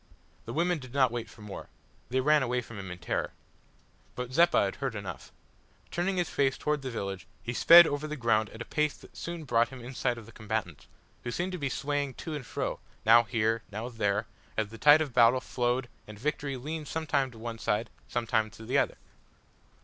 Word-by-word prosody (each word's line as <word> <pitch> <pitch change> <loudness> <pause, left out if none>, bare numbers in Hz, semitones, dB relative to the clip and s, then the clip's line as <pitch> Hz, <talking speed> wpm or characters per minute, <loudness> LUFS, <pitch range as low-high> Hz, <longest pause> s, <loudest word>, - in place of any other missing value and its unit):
The 115 - -6
women 175 +1 +1
did 130 -1 -11
not 130 -3 +4
wait 115 -2 -4
for 110 - -14
more. 105 -2 -8 0.4
They 130 +1 +1
ran 150 +2 +4
away 125 -1 0
from 115 -3 -9
him 95 -1 -6
in 90 - -6
terror. - - -2 0.8
But 125 0 -5
Zeppa 170 -7 +5
had 95 - -4
heard 135 -4 -3
enough. 95 -4 -7 0.6
Turning 185 +2 0
his 175 -2 +1
face 135 -1 +1
towards 150 -1 0
the 130 - -4
village 100 -6 -5 0.2
he 120 - -3
sped 170 +7 +9
over 145 0 -2
the 150 - -4
ground 110 -3 +2
at 110 - -7
a - - -18
pace 150 -1 0
that - - -17
soon 170 -1 -5
brought 120 -4 +2
him 130 - -9
in 125 +2 -8
sight 125 -1 0
of 115 - -9
the 115 - -13
combatants, 105 -8 -4 0.4
who - - -3
seemed 175 +9 -2
to 180 - -4
be 140 -2 -1
swaying 145 -1 -2
to 160 - -6
and 140 -6 -5
fro - - -3 0.3
now 115 +2 +8
here, 115 +1 +1
now 110 +4 -4
there 105 -2 0 0.3
as 110 -2 0
the 115 +1 -11
tide 150 +4 +7
of 145 -5 -2
battle 120 +1 +6
flowed 125 0 -1 0.2
and 105 -1 -10
victory 140 +2 -2
leaned 150 +4 -5
sometimes 140 -5 0
to - - -13
one 115 0 -6
side 105 +2 -1 0.2
sometimes 115 -2 -1
to 110 - -10
the 125 - +2
other. - - 0
125 Hz, 215 wpm, -29 LUFS, 110-145 Hz, 0.8 s, sped